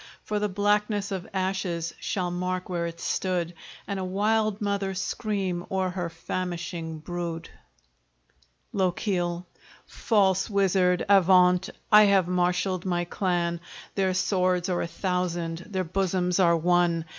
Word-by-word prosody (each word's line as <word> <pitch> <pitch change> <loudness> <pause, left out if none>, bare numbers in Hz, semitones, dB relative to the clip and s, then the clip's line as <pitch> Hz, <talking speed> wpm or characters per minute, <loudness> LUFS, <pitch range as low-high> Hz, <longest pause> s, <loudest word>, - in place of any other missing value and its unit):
For 210 -1 -2
the 210 0 0
blackness 205 +1 +1
of 190 -2 -4
ashes 185 -3 -2
shall 180 -3 -2
mark 180 +1 -3
where 170 -2 -1
it 170 0 -8
stood, 175 -2 -1 0.3
And 200 -1 -3
a - - -2
wild 210 +2 +1
mother 200 -2 -1
scream 190 -2 -2
o'er 190 -1 0
her 180 -2 -3
famishing 170 -1 -4
brood. 170 +1 -5 1.2
LOCHIEL 180 -2 -1 0.4
False 190 -3 +1
Wizard, 190 -3 +2
avaunt! 180 -2 +5 0.2
I 210 0 +9
have 195 -3 +4
marshaled 180 0 0
my 175 -2 -1
clan; 175 -2 -1 0.3
Their 190 -2 +1
swords 185 -1 +1
are 180 - 0
a - - -2
thousand, 175 -2 -2
their 190 -2 -1
bosoms 180 0 0
are 170 -2 +5
one! 170 -1 +2
185 Hz, 130 wpm, -26 LUFS, 175-195 Hz, 1.2 s, I